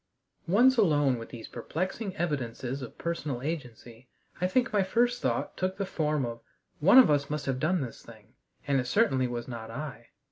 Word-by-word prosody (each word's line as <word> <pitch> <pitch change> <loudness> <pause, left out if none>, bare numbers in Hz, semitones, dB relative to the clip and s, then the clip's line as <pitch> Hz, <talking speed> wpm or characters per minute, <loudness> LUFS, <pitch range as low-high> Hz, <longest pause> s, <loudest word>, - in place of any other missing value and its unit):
Once 245 +9 +5
alone 145 - +3
with 115 - -9
these 115 -2 -9
perplexing 185 - -4
evidences 135 - -3
of 125 - -9
personal 150 -7 -3
agency, 125 -6 -6 0.3
I 180 - +3
think 250 +5 +1
my 205 - +4
first 240 +5 +1
thought - - -1
took 185 +1 -2
the 200 - -1
form 150 -6 0
of 115 0 -6 0.4
"One 195 - +6
of 255 -11 +8
us 140 -1 +1
must 150 -1 -3
have 130 -2 -1
done 170 +4 +1
this 125 -4 -7
thing, 110 -1 -16 0.3
and 140 -1 +2
it 125 - -2
certainly 135 - +2
was 120 -1 -5
not 115 -3 -7
I." 120 -2 -7
145 Hz, 185 wpm, -29 LUFS, 120-185 Hz, 0.4 s, of